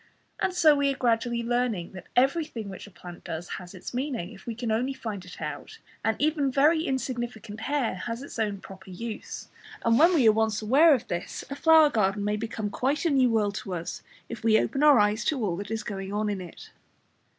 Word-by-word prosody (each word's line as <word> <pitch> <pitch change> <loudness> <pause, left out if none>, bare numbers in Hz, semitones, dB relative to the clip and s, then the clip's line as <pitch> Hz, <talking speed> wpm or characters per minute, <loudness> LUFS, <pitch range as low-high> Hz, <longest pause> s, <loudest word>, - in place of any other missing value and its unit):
And - - +1
so 320 -4 +5
we 280 -1 +2
are 270 - -5
gradually 235 -1 +1
learning 235 -7 -1
that 185 - -11
everything 265 -4 +1
which 190 +1 -9
a - - -12
plant 175 -2 -11
does 165 +2 -5
has 180 +1 -11
its 185 - -8
meaning, 250 -8 -3
if 190 - -15
we 230 - -3
can 235 -1 -3
only 250 +5 0
find 210 -7 -5
it 180 - -11
out, 440 - -6 0.3
and 220 0 +1
that - - -9
even 295 -3 +2
very 305 +5 +4
insignificant 240 -5 -4
hair 275 0 0
has 230 +6 -5
its 280 - -8
own 205 -3 -1
proper 190 0 -12
use, 220 +4 -7 0.4
and 230 0 +4
when 340 +3 +6
we 260 -8 +5
are - - +9
once 220 -1 +1
aware 280 +8 +5
of 245 - -6
this 175 -1 -4
a - - -2
flower 315 0 +6
garden 200 -1 +1
may 210 +1 0
become 220 -1 -4
quite 275 +9 -1
a 330 - +3
new 260 -3 +4
world 210 -3 +1
to 190 -4 -5
us 170 0 -5 0.3
if 230 -1 -8
we 220 -1 +5
open 270 +6 0
our 295 -3 +7
eyes 210 +1 +2
to 270 -8 0
all 175 -4 -1
that 200 +1 -6
is 220 -1 -3
going 195 -2 -5
on 210 0 -1
in 195 -2 -4
it. 175 -2 -11
225 Hz, 225 wpm, -27 LUFS, 205-270 Hz, 0.4 s, are